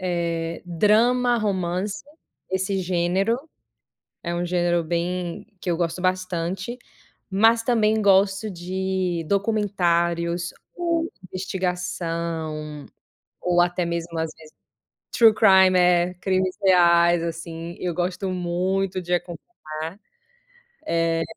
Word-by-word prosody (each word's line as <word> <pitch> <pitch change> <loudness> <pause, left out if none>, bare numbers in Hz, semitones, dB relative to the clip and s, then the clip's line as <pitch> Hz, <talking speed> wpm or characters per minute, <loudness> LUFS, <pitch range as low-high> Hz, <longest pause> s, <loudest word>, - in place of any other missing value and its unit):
eh, 170 -2 -2
drama, 230 +8 +3
romance, 195 -2 -2 0.5
esse 190 +1 -1
gênero 185 +5 +1 0.9
é 170 - -2
um 175 - -1
gênero 175 -1 +1
bem 175 +1 -3
que 180 - -4
eu 170 - +1
gosto 170 +1 -2
bastante, 185 +3 -2 0.5
mas 225 +4 +4
também 220 -2 +2
gosto 195 +1 +3
de 185 -1 -2
documentários 175 -4 0 0.2
ou 335 -1 -1 0.2
investigação, 170 -5 -3 0.5
ou 175 -1 +2
até 175 0 0
mesmo 170 0 -3
às 160 0 -1
vezes, 155 -1 -16 0.6
true 225 -2 +6
crime, 185 -3 +5
crimes 185 -1 0
reais 175 -2 +5
assim, 165 0 -6
eu 175 -2 -2
gosto 180 +2 -2
muito 185 +2 -1
de 180 0 -1
acompanhar. 170 - -6 1.2
Eh 165 - 0
180 Hz, 100 wpm, -23 LUFS, 170-195 Hz, 1.2 s, true